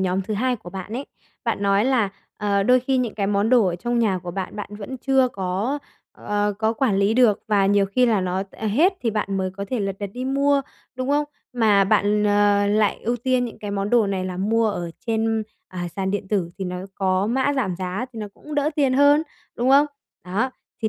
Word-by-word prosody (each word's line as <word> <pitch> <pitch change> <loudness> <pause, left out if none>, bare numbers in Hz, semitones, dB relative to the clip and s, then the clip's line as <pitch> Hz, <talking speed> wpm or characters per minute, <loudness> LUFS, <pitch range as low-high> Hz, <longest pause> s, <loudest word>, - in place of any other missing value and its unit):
nhóm 190 +1 0
thứ 215 +3 -3
hai 250 +3 0
của 175 - -11
bạn 190 +3 -7
ấy, 265 +4 -4 0.4
bạn 200 - -1
nói 200 +1 +3
là, 250 -6 +2 0.3
ờ, 200 -1 +1
đôi 250 +4 +4
khi 265 +1 0
những 240 -4 -1
cái 200 -2 -1
món 200 +2 +1
đồ 240 -6 +5
ở 175 - -1
trong 240 +6 -1
nhà 200 -5 +2
của 175 0 -7
bạn, 190 +2 -5
bạn 205 - -6
vẫn 220 +6 -6
chưa 265 -1 +3
có, 200 +6 -2 0.3
ờ, 205 0 -1
có 220 0 +1
quản 230 -5 +1
lý 200 +2 +2
được 235 -4 +4
và 200 -2 +3
nhiều 200 0 +3
khi 250 +6 +2
là 220 -4 +2
nó, 185 +1 -1
ờ, 220 - -6
hết 310 - +3
thì 230 - 0
bạn 200 -2 -2
mới 190 -1 -1
có 200 - -3
thể 250 -4 -1
lật 195 -1 -2
đật 200 -2 -4
đi 250 +1 -4
mua, 280 +1 +2 0.3
đúng 255 +1 -4
không? 290 +1 +2 0.3
Mà 215 -5 +4
bạn, 210 +1 +2
ờ, 205 0 +3
lại 210 0 +2
ưu 240 +2 0
tiên 255 +1 +1
những 235 - -7
cái 205 - -5
món 200 0 -2
đồ 235 -4 +4
này 190 -2 -2
là 180 -1 -4
mua 220 +3 +1
ở 175 -4 -4 0.2
trên, 225 -1 0 0.3
à, 175 -1 -5
sàn 190 -1 -1
điện 200 -1 -3
tử 190 -5 0
thì 190 - -3
nó 180 0 -4 0.2
có 190 0 +1
mã 265 +5 +1
giảm 190 -9 -1
giá 185 +7 -3
thì 225 - -8
nó 210 -1 -5
cũng 300 0 -9
đỡ 290 +1 +1
tiền 275 -3 +3
hơn, 285 +3 +5 0.3
đúng 245 +2 +1
không? 285 +2 +6 0.4
Đó, 205 +8 -1 0.3
thì 220 - +2
210 Hz, 240 wpm, -23 LUFS, 195-250 Hz, 0.4 s, không